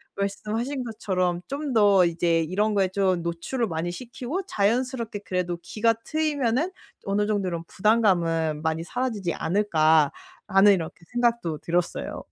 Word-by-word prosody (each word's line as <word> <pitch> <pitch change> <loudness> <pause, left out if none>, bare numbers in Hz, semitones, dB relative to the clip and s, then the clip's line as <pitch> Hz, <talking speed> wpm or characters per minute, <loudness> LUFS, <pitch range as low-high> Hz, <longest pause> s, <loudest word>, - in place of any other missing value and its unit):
말씀하신 220 +7 -2
것처럼 185 -6 -1
'좀 280 0 -3
더 200 -4 +5
이제 170 0 +1
이런 200 +7 0
거에 195 -2 +3
좀 185 -2 +1
노출을 170 +9 -2
많이 165 0 -3
시키고 255 - -5
자연스럽게 230 - 0
그래도 180 -2 -2
귀가 225 +6 +1
트이면은 300 -1 0 0.3
어느 200 +1 +1
정도 205 -3 0
이런 170 -1 -4
부담감은 175 -7 +2
많이 160 0 -1
사라지지 215 -5 -2
않을까.'라는 175 +2 +2
이렇게 170 -1 -4
생각도 235 -9 0
들었어요. 175 +1 -2
200 Hz, 335 characters per minute, -25 LUFS, 170-235 Hz, 0.3 s, 더